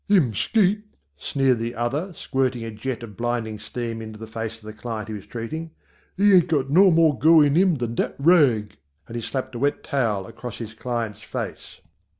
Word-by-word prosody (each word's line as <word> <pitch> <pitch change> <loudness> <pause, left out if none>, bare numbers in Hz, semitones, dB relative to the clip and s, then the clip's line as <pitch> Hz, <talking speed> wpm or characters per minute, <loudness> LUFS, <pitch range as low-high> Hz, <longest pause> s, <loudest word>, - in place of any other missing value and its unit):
"Him 175 - +4
skate," 210 - +2 0.3
sneered 130 - +1
the 115 +1 -3
other 135 +11 -2
squirting 130 -5 -1
a 115 - -5
jet 120 +3 -5
of 105 -4 -9
blinding 115 -1 -2
steam 115 -1 -5
in 110 -1 -7
the 110 +1 -8
face 110 0 -5
of 110 - -22
the 110 0 -8
client 110 -1 -5
he - - -4
was 100 -2 -8
treating, 155 +8 -5 0.5
"he 200 +1 +5
ain't 180 -3 +6
got 140 -4 0
no 190 +5 +7
more 160 -6 +4
go 160 +5 +7
in 145 -1 +4
him 180 +1 +4
than 120 -4 -3
dat - - -1
rag," 135 - +3 0.3
and 115 - -9
he 120 - -2
slapped 130 +3 -4
a 120 - -5
wet 145 +2 0
towel 110 -8 0
across 120 +4 -8
his 110 -2 -7
client's 115 -2 -4
face. - - -6
120 Hz, 200 wpm, -24 LUFS, 110-150 Hz, 0.5 s, no